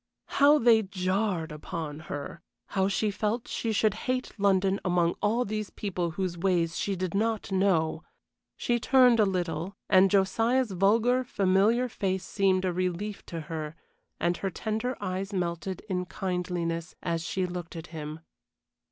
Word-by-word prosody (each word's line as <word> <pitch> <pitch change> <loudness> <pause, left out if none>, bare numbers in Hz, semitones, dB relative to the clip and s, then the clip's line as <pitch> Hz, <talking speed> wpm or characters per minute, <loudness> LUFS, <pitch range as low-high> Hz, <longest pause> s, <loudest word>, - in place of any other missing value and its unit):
How 290 +2 +8
they 230 -4 +5
jarred 185 -3 -1
upon 150 0 -5
her! 145 +3 -5 0.3
How 190 0 +1
she 205 +2 0
felt 215 +3 -2
she 225 - -2
should 215 -1 +2 0.2
hate 255 0 0
London 195 0 +3
among 175 -2 +2
all 230 +4 +2
these 215 0 -3
people 180 -4 -3
whose 185 -3 -2
ways 170 -3 +1
she 200 - -1
did 185 -2 -3
not 220 0 0
know! 175 -5 +2 0.6
She 240 0 0
turned 250 -1 +5
a 210 - +5
little, 180 0 -2
and 190 0 +6
Josiah's 225 +5 +2
vulgar 225 +7 +3
familiar 210 +2 +2
face 190 -5 -2
seemed 190 -2 +1
a 180 - 0
relief 185 +3 -2
to 165 -1 -5
her, 155 0 -5 0.4
and 175 0 +1
her 195 - -2
tender 220 +6 -3
eyes 190 +2 -3
melted 175 0 -2
in 180 -2 -1
kindliness 180 -3 -3
as 165 -1 -1
she 185 +1 -1
looked 175 -2 -6
at 165 0 -6
him. 155 0 -6
190 Hz, 150 wpm, -28 LUFS, 175-215 Hz, 0.6 s, How